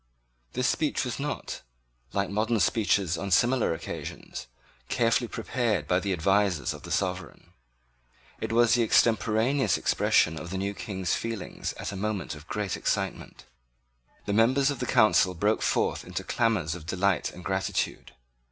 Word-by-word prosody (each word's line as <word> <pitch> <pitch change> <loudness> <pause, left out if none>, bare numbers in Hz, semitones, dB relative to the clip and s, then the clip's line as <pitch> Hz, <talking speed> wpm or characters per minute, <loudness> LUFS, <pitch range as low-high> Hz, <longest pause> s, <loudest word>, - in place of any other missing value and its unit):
This 125 +1 +1
speech 150 -2 0
was 125 - -4
not, 145 +1 -4 0.5
like 100 0 -1
modern 110 +2 +1
speeches 95 -2 +2
on 100 - -3
similar 120 +6 +3
occasions, 80 - -7 0.4
carefully 120 0 +2
prepared 120 -2 -1
by 90 - +3
the 100 0 -2
advisers 95 -2 +1
of 75 - -10
the 85 - -10
sovereign. 90 -1 -3 0.9
It - - -3
was 120 0 +4
the 120 - +4
extemporaneous 115 - +3
expression 80 -2 +2
of 85 - -7
the 95 - -3
new 100 +1 -2
King's 95 -3 -3
feelings 115 -3 -4
at - - -5
a - - -6
moment 100 -2 -2
of 75 0 -12
great 105 -3 -2
excitement. - - -3 0.8
The 100 - -1
members 130 +6 +4
of 140 - -5
the - - -2
Council 110 -6 +4
broke 105 +6 +1
forth - - 0
into - - -5
clamours 110 -9 0
of 80 -2 -9
delight 95 0 +1
and 90 - -12
gratitude. 95 -2 -2
100 Hz, 150 wpm, -27 LUFS, 90-115 Hz, 0.9 s, was